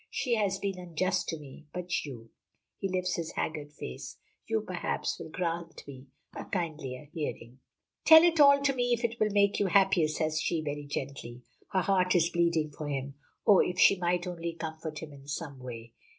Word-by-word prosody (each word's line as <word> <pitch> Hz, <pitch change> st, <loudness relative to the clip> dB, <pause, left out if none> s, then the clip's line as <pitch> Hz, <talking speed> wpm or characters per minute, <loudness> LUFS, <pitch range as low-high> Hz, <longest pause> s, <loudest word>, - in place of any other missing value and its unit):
She 250 Hz, -, -1 dB
has 200 Hz, -4 st, +1 dB
been 195 Hz, -2 st, -3 dB
unjust 180 Hz, +2 st, -1 dB
to 165 Hz, -, -2 dB
me. 150 Hz, +1 st, -13 dB
But 180 Hz, -1 st, -2 dB
you," 115 Hz, -5 st, -9 dB, 0.5 s
he 195 Hz, -, -2 dB
lifts 185 Hz, -1 st, -1 dB
his 165 Hz, -2 st, -4 dB
haggard 150 Hz, -2 st, -3 dB
face, 65 Hz, -, -8 dB, 0.3 s
"you, -, -, +1 dB
perhaps, -, -, -3 dB
will -, -, -7 dB
grant 170 Hz, -1 st, -4 dB
me 135 Hz, -1 st, -10 dB, 0.3 s
a -, -, -5 dB
kindlier 155 Hz, -7 st, -4 dB
hearing." 130 Hz, -6 st, -5 dB, 0.4 s
"Tell 320 Hz, 0 st, +9 dB
it 335 Hz, -2 st, +3 dB
all 280 Hz, -1 st, +7 dB
to 275 Hz, -1 st, +3 dB
me, 245 Hz, -1 st, +1 dB
if 235 Hz, +1 st, -1 dB
it 230 Hz, 0 st, -1 dB
will 215 Hz, -, +3 dB
make 200 Hz, 0 st, +3 dB
you 200 Hz, -, +2 dB
happier," 190 Hz, -3 st, +4 dB
says 155 Hz, 0 st, -1 dB
she, 165 Hz, -2 st, 0 dB
very 145 Hz, -1 st, -4 dB
gently. 130 Hz, -3 st, -6 dB, 0.3 s
Her 190 Hz, -, +2 dB
heart 185 Hz, -1 st, +2 dB
is 170 Hz, 0 st, +3 dB
bleeding 170 Hz, -3 st, +1 dB
for 150 Hz, +1 st, -6 dB
him. 140 Hz, -1 st, -3 dB, 0.3 s
Oh, 200 Hz, -3 st, +7 dB
if 180 Hz, -, +1 dB
she -, -, +7 dB
might 175 Hz, -1 st, 0 dB
only 170 Hz, -2 st, -4 dB
comfort 160 Hz, -1 st, -6 dB
him 150 Hz, -2 st, -9 dB
in 140 Hz, 0 st, -14 dB
some 145 Hz, -2 st, -5 dB
way! 115 Hz, -2 st, -8 dB
170 Hz, 195 wpm, -30 LUFS, 145-190 Hz, 0.5 s, Tell